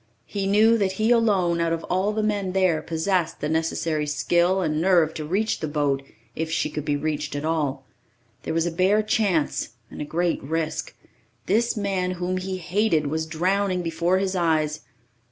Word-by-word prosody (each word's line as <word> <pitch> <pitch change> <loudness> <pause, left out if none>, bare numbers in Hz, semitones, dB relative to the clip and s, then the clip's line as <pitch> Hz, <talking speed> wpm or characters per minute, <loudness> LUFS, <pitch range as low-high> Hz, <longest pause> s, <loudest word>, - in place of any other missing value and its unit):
He 195 -1 -3
knew 220 +3 +4
that 190 -2 +1
he 215 +4 +1
alone, 195 -8 +3
out 165 0 +1
of 165 0 -2
all 190 +3 0
the 215 0 -1
men 200 -3 -1
there, 185 -5 +2
possessed 165 +1 -1
the 150 - -2
necessary 160 -1 -1
skill 175 +5 +2
and 155 -1 0
nerve 170 -3 +3
to 155 - -5
reach 200 +8 0
the 155 - -3
boat 145 -2 0 0.3
if 160 0 -2
she 160 - -1
could 150 - -4
be 145 - +1
reached 150 -1 -3
at 145 +1 -3
all. 145 -4 -1 0.6
There - - -4
was 165 0 +2
a 175 - -1
bare 190 +5 +3
chance 190 - 0 0.2
and - - -7
a - - -1
great 170 +3 -1
risk. 160 +2 -3 0.5
This 230 +4 +1
man 190 -3 -1
whom 180 +1 -2
he 185 0 -3
hated 180 -2 +1
was 160 0 -2
drowning 185 +3 0
before 170 +2 +1
his 190 0 -1
eyes. 155 -3 +1
175 Hz, 185 wpm, -24 LUFS, 155-195 Hz, 0.6 s, knew